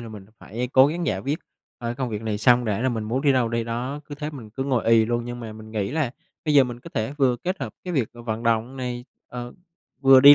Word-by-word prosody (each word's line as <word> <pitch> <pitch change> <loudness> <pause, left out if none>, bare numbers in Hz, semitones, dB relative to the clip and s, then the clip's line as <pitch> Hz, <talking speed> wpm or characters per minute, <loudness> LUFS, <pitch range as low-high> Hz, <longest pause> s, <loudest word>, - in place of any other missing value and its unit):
là 115 - -7
mình 105 -3 -10
phải 120 +5 -4
cố 130 +1 +8
gắng 170 +3 -2
giải 95 - +1
quyết, 140 +9 -1 0.4
ờ, 120 - -4
cái 120 - -2
công 130 0 -2
việc 105 0 -3
này 110 -2 -1
xong 120 +2 +5
đã 105 -2 0
rồi 130 +1 +2
mình 110 -3 -2
muốn 120 +5 0
đi 145 -2 +5
đâu 125 -3 +2
đi 115 0 -1
đó. 125 +5 -3
Cứ 145 - -7
thế 150 +1 -4
mình 125 -8 -9
cứ 135 +5 -3
ngồi 130 -4 +1
ì 115 -1 +6
luôn, 120 +1 -1
nhưng 120 0 -5
mà 115 -2 -6
mình 110 0 -11
nghĩ 105 -3 -1
là 150 -3 0 0.3
bây 150 -2 +2
giờ 140 -2 +8
mình 120 -1 -6
có - - -11
thể 110 +5 -1
vừa 130 -3 +4
kết 185 +9 -3
hợp - - -4
cái 180 - -3
việc 135 -9 +1
v 120 - -15
vận 110 0 -2
động 115 +2 +1
này, 125 -1 -4 0.2
ờ, 120 0 -6 0.5
vừa 135 -1 +8
đi 145 +2 +11
120 Hz, 290 wpm, -24 LUFS, 115-135 Hz, 0.5 s, đi